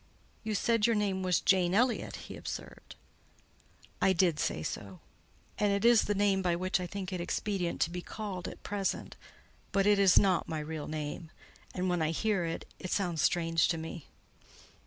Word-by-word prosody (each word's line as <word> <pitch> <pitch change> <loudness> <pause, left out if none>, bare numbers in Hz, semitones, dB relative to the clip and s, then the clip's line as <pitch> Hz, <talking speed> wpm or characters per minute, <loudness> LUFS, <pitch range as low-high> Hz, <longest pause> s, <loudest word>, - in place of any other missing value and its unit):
"You 215 -1 -2
said 230 +1 +2
your 230 - +2
name 200 -3 0
was 185 -2 +2
Jane 185 -1 +3
Elliott?" 245 +2 +1
he - - -8
observed. - - -8 1.1
"I 190 - +4
did 170 -3 +2
say 80 - -1
so; 95 +1 -6 0.6
and 205 -1 +3
it 200 +2 0
is 235 -2 +6
the 205 - 0
name 195 -1 +2
by 175 -2 +1
which 185 +2 0
I 180 - -3
think 190 +1 -5
it 180 - -2
expedient 180 0 -2
to 165 - +2
be 180 0 -4
called 190 -3 -5
at - - -9
present, 200 -1 -2 0.6
but 195 0 +2
it 205 -1 +4
is 195 -2 +6
not 190 -3 +3
my 160 - -2
real 150 0 -5
name, 155 +1 -5 0.5
and 185 0 -1
when 175 -2 +1
I 155 - +1
hear 195 +2 0
it, 165 0 -4
it 185 - -6
sounds 175 -6 0
strange 165 0 +2
to 165 - 0
me." 160 0 -7
185 Hz, 185 wpm, -31 LUFS, 165-200 Hz, 1.1 s, is